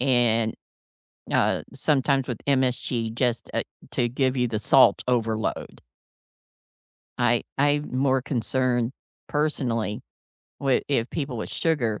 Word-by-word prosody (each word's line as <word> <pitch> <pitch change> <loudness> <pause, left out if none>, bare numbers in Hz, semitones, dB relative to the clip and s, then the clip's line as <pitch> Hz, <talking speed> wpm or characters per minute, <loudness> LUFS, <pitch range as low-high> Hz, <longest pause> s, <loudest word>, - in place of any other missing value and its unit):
and, 120 -4 +2 0.8
uh, - - +2
sometimes 135 -2 +1
with 125 -5 -4
MSG 125 -4 0
just, 120 -1 0
uh, - - 0 0.3
to 120 -1 0
give 130 +1 0
you 125 -1 +1
the 110 -2 -2
salt 130 +4 +5
overload. 115 -3 -1 1.4
I 120 -1 +3
I'm 145 0 +1
more 135 -1 +2
concerned 125 -1 0 0.3
personally 120 -8 -1 0.6
wi 135 -2 +2
if 125 -4 0
people 140 -6 -3
with 110 - -5
sugar, 125 -10 0
125 Hz, 115 wpm, -25 LUFS, 115-135 Hz, 1.4 s, salt